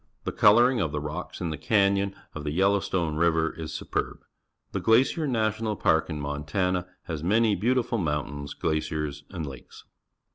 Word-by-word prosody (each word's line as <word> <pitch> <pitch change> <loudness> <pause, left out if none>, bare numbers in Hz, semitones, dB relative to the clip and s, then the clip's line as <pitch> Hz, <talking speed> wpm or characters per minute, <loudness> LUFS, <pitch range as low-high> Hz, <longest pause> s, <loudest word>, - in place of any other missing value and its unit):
The - - -2
colouring 120 +3 +5
of 80 - -1
the 75 - -2
rocks 75 +6 -6
in 85 -3 -1
the 75 - -5
canyon 100 +1 +2 0.2
of 75 - -6
the 75 - -2
Yellowstone 95 -2 +1
River 80 -1 +2
is 80 -1 -6
superb. - - -3 0.5
The - - -2
Glacier 135 +7 +3
National 110 -3 0
Park 80 -4 +2
in 75 -2 -4
Montana 75 +6 -1 0.2
has 80 -3 -5
manj' 105 +3 +2
beautiful 125 +1 +1
mountains, 70 -3 -3
glaciers, 75 -2 -2
and 85 -5 -5
lakes. 65 -3 -11
85 Hz, 155 wpm, -27 LUFS, 75-105 Hz, 0.5 s, colouring